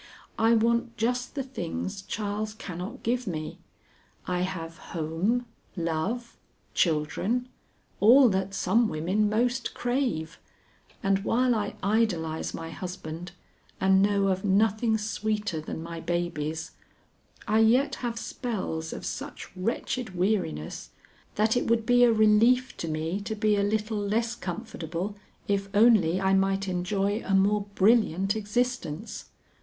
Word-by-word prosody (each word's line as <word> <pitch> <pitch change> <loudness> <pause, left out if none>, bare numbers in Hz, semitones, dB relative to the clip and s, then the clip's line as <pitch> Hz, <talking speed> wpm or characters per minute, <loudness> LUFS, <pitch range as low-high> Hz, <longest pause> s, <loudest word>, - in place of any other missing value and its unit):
I 225 +1 +5
want 235 +1 +1
just 245 +4 -1
the 275 - -1
things 205 -4 -4
Charles 210 +1 -3
cannot 180 -2 -7
give 245 +1 0
me. 155 -4 -4 0.7
I 180 -1 -1
have 165 -3 -4 0.2
home, 170 +10 0 0.3
love, 175 +9 -2 0.4
children, 185 +10 0 0.5
all 250 +6 +8
that 190 0 -1
some 225 +3 +2
women 190 +7 +1
most 240 +3 0
crave, 245 - -1 0.6
and 195 0 +3
while 250 +3 +2
I 210 -2 -2
idolize 185 -7 0
my 165 0 -6
husband 175 0 -7 0.5
and 190 0 +4
know 200 -1 +3
of 190 0 0
nothing 220 +3 +2
sweeter 210 -4 -2
than 160 +1 -6
my 165 0 -6
babies, 160 -2 -2 0.8
I 215 +1 +3
yet 240 +6 +4
have 235 -2 -2
spells 185 -11 -4
of - - -7
such - - -6
wretched 225 +2 -2
weariness, 180 - -1 0.5
that 215 +2 +2
it 245 - 0
would 230 -1 +2
be 245 +1 +5
a 240 - +6
relief 225 +4 +4
to 165 - -4
me 160 +5 -2
to 220 +2 -4
be 215 0 +2
a 200 - +1
little 215 +1 0
less 225 +3 0
comfortable 180 -2 -5 0.3
if 200 0 0
only 205 -6 +5
I 190 0 +2
might 195 0 +2
enjoy 195 +4 0
a 195 - +1
more 200 +1 +3
brilliant 195 -2 +3
existence. 215 -3 -2
205 Hz, 130 wpm, -27 LUFS, 180-230 Hz, 0.8 s, all